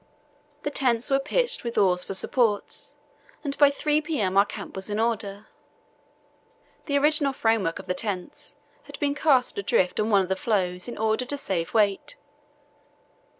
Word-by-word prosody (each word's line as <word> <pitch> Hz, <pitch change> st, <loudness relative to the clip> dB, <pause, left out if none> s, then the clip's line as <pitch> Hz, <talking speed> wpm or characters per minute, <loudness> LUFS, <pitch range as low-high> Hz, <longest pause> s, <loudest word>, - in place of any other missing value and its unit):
The 290 Hz, -, -2 dB
tents 250 Hz, -2 st, +1 dB
were 270 Hz, -, +4 dB
pitched 480 Hz, -, 0 dB
with 235 Hz, -1 st, -5 dB
oars 180 Hz, -2 st, +3 dB
for 195 Hz, -, -5 dB
supports, 220 Hz, 0 st, 0 dB, 0.5 s
and 280 Hz, -2 st, -2 dB
by 290 Hz, -1 st, +7 dB
3 300 Hz, +1 st, 0 dB
p.m. 230 Hz, -, -1 dB
our 200 Hz, +1 st, +5 dB
camp 205 Hz, -1 st, -8 dB
was 190 Hz, +2 st, -5 dB
in 210 Hz, +1 st, -2 dB
order. 215 Hz, -3 st, -2 dB, 1.4 s
The 285 Hz, -2 st, +2 dB
original 290 Hz, -1 st, +3 dB
framework 225 Hz, -9 st, +1 dB
of -, -, -9 dB
the 180 Hz, -, -1 dB
tents 185 Hz, -2 st, -5 dB, 0.3 s
had -, -, -10 dB
been 285 Hz, -2 st, +1 dB
cast 285 Hz, -7 st, +2 dB
adrift 190 Hz, -2 st, +1 dB
on 215 Hz, -, +1 dB
one 200 Hz, -2 st, +5 dB
of 185 Hz, -, -7 dB
the 190 Hz, -, +1 dB
floes 185 Hz, -3 st, -1 dB
in 240 Hz, -, -7 dB
order 220 Hz, +3 st, 0 dB
to 285 Hz, +3 st, -2 dB
save 185 Hz, -8 st, -3 dB
weight. 205 Hz, -, +1 dB
225 Hz, 165 wpm, -25 LUFS, 195-280 Hz, 1.4 s, by